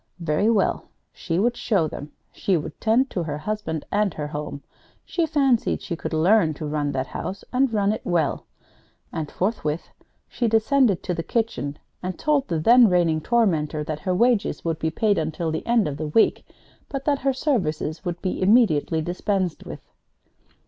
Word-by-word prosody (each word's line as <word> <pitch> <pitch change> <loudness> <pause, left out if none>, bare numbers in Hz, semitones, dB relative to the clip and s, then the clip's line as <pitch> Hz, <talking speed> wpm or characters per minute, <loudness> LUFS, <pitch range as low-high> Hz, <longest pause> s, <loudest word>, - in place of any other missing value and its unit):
Very 170 +6 +1
well, 220 -4 +1 0.3
she 165 -2 -3
would 235 +5 +2
show 195 -9 +1
them. 145 0 -8 0.2
She 190 -3 0
would 155 0 -7
tend 240 +5 +2
to 180 - -2
her 150 -3 -3
husband 160 -3 -4
and 205 -3 +1
her 150 - -3
home. 150 -1 -6 0.4
She 335 -2 0
fancied 275 -6 +2
she 170 - -5
could - - -5
learn 165 0 +3
to 155 - -6
run 150 -1 -1
that 130 0 -1
house, 195 +7 -6
and 260 0 +2
run 205 -2 +2
it 215 - -3
well! 170 -5 0 0.7
And 155 -2 -3
forthwith 170 -6 -2 0.4
she 240 - -1
descended 225 - +3
to 180 - -2
the 165 - -2
kitchen 165 -9 -2 0.2
and 185 -1 -4
told 295 -3 +1
the 165 - -1
then 235 +7 +6
reigning 170 -3 +2
tormentor 160 -9 +1
that 155 -1 -4
her 185 +3 -1
wages 235 -2 +1
would 165 -2 -1
be 160 - 0
paid 205 +4 +1
until 160 +1 -2
the 160 - -3
end 235 -5 +3
of 140 -1 -4
the 155 0 -3
week, 185 +9 +2 0.4
but 275 -1 -5
that 285 -2 +2
her 275 - +1
services 185 - -1
would 175 -2 -3
be 185 - -2
immediately 185 -7 +3
dispensed 180 0 -2
with. - - -8
180 Hz, 180 wpm, -24 LUFS, 155-225 Hz, 0.7 s, then